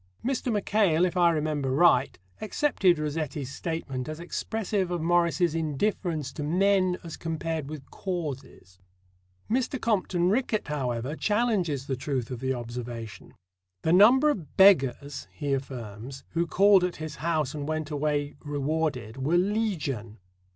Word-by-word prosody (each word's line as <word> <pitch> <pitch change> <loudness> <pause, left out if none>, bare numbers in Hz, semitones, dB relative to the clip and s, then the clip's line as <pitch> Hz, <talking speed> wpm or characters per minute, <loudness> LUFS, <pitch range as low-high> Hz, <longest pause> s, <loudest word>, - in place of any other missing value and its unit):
Mr. 255 -1 -1
Mackail, 200 -5 +2
if 180 - -2
I 175 -1 +5
remember 150 -4 -1
right, 170 +7 +4 0.2
accepted 205 - +2
Rossetti's 150 -3 -3
statement 140 -4 -4
as 155 +1 -6
expressive 195 +2 -2
of 175 -1 -2
Morris's 170 0 +2
indifference 160 0 -1
to - - -6
men 185 +3 +2
as 165 -2 -7
compared 160 -2 -3
with 150 -3 -9
causes. 135 - -6 0.7
Mr. 255 +3 0
Compton 185 -5 +1
Rickett, 220 - 0
however, 130 -1 -2
challenges 200 - 0
the 135 - -2
truth 130 -2 -3
of 125 - -4
the 130 +1 -1
observation. 120 -3 -6 0.5
"The 160 - +2
number 250 +10 +7
of 175 - -7
'beggars,'" 140 -7 +4
he 145 -2 -2
affirms, 130 -1 -6
"who 170 +1 -1
called 195 +1 +5
at 180 -1 -1
his 155 -2 -7
house 155 -3 -1
and 145 -1 -5
went 155 -1 -3
away 145 0 -1
rewarded 145 -5 -2
were 145 +6 +1
legion." 175 - -1
155 Hz, 135 wpm, -27 LUFS, 135-185 Hz, 0.7 s, number